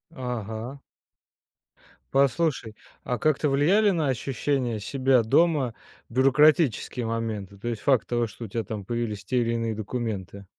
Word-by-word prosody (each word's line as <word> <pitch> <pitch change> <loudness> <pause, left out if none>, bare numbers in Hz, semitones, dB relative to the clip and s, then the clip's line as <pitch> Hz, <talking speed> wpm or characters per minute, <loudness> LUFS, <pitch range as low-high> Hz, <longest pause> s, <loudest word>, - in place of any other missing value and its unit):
Ага. 125 +1 -5 1.3
Послушай, 135 -4 +1 0.3
а 125 - -1
как-то 150 +3 +1
влияли 185 +10 +4
на 160 -6 0
ощущение 130 -3 -1
себя 130 0 +2
дома 145 -1 +2 0.4
бюрократические 135 - +3
моменты, 110 -4 -4
то 120 +4 -4
есть 115 -3 -4
факт 130 -1 +3
того, 120 -1 0
что 115 +2 -9
у - - -7
тебя 115 +2 -3
там 105 -2 -5
появились 110 -2 -3
те 125 +5 0
или 115 -1 0
иные 115 -1 -1
документы? 105 -3 -5
120 Hz, 135 wpm, -26 LUFS, 110-135 Hz, 1.3 s, влияли